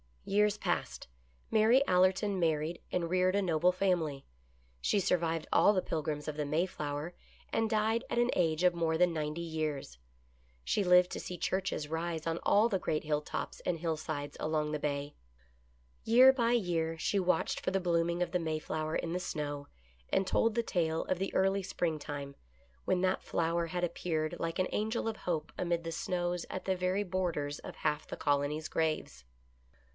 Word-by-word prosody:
Years 210 +1 +2
passed. - - -2 0.4
Mary 225 +5 +5
Allerton 185 +2 +3
married 160 0 0
and 170 -2 -1
reared 185 +1 +2
a 200 - +3
noble 175 -1 +3
family. 175 -7 0 0.5
She 200 - +1
survived 165 -3 0
all 205 - +5
the 185 - +1
Pilgrims 150 -3 -3
of 155 -1 -4
the 150 - -1
May 155 +5 +1
flower 150 -1 -4 0.4
and 225 -1 +1
died 220 +1 +1
at - - -2
an 240 +1 +3
age 165 -1 +1
of 180 -1 +5
more 165 -1 0
than 175 0 +3
ninety 155 +1 -3
years. 155 - -3 0.7
She 205 - +1
lived 180 0 +5
to - - -4
see 180 - -6
churches 185 -5 -1
rise 160 0 -3
on 165 0 -1
all 210 +3 +5
the 195 -4 0
great 155 -3 -1
hilltops 150 -1 -3
and 175 - 0
hillsides 155 -3 -3
along 155 -1 0
the 150 - -2
Bay. 145 0 -3 0.9
Year 250 +4 +8
by 240 -3 +1
year 165 -7 0
she 200 +5 0
watched 185 -1 +1
for - - -2
the 195 - +1
blooming 170 -1 +1
of - - -5
the 180 - +1
Mayflower 155 -1 -2
in 170 - -2
the 180 - -1
snow, 145 -5 -4 0.4
and 195 - +2
told 225 +3 +2
the 235 - +1
tale 165 -6 0
of 185 - -1
the 195 - -2
early 195 +1 +3
springtime 145 -6 -3 0.2
— 60 -1 -33
when 180 - +1
that 185 0 +1
flower 170 0 0
had 180 +1 -3
appeared 160 -2 -1
like 165 0 -2
an 185 - +2
angel 220 +2 -1
of 220 -1 -2
hope 160 -4 -3
amid 170 -1 0
the 165 - -4
snows 175 +1 -2
at 185 - -5
the 190 - +1
very 185 +2 0
borders 175 -6 -2
of - - -9
half 150 0 -1
the - - -6
colony's 145 +2 0
graves. 155 - -2
170 Hz, 180 wpm, -32 LUFS, 155-185 Hz, 0.9 s, Year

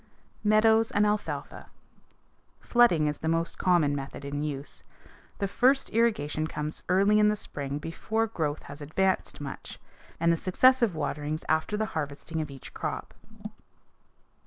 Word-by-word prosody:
Meadows 220 +1 +4
and 205 +1 +2
alfalfa. 165 -9 -3 0.9
Flooding 235 -11 +4
is 150 0 -1
the 160 - -4
most 165 +1 -1
common 170 -6 +3
method 140 0 -6
in 145 +1 -3
use. 145 -2 -5 0.6
The 200 - -1
first 260 +7 +2
irrigation 160 -10 +1
comes 150 0 -5
early 200 +3 +4
in 210 - +5
the 210 - +3
spring 140 -8 -5
before 215 +9 -2
growth 155 -9 -3
has 145 +1 -10
advanced 190 +6 0
much, 140 -2 -7 0.4
and 170 0 +3
the - - 0
successive 235 +3 +3
waterings 150 0 -3
after 160 +6 +1
the 220 - 0
harvesting 155 +2 -3
of 155 - -5
each 135 -2 -10
crop. - - -4
165 Hz, 140 wpm, -28 LUFS, 150-210 Hz, 0.9 s, in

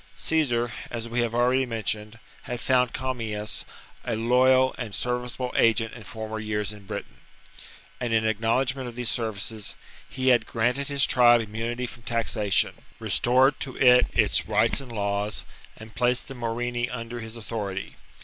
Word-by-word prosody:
Caesar, 120 -7 +1 0.2
as 115 -1 -4
we 120 +1 -2
have 120 -1 0
already 125 +2 +3
mentioned, 110 -2 -3 0.3
had 120 -1 -4
found 125 -1 +2
Commius 115 -5 -3 0.4
a 115 - -2
loyal 130 +3 +4
and 115 -5 -4
serviceable 125 0 -2
agent 115 -1 +3
in 120 - -10
former 110 0 -6
years 105 -1 -2
in 100 -2 -14
Britain; - - -6 0.8
and, 120 -2 -2
in 110 -1 +2
acknowledgment 125 +4 0
of 120 - -8
these 120 -3 -1
services, 110 -2 -2 0.3
he 130 0 0
had 120 -3 +4
granted 125 +4 0
his 140 -1 +2
tribe 120 -1 +6
im 105 -1 -8
munity 120 +3 -2
from 120 0 -11
taxation, 110 -3 +1 0.2
restored 130 +3 +3
to 130 - -5
it 125 -1 +6
its - - +3
rights 110 +5 +2
and 130 -3 -10
laws, 100 -1 -2 0.3
and 110 0 -12
placed 125 +1 +1
the 135 - -7
Morini 120 0 -2
under 120 0 -6
his 110 0 -7
authority. 105 -4 -5
120 Hz, 160 wpm, -26 LUFS, 110-125 Hz, 0.8 s, tribe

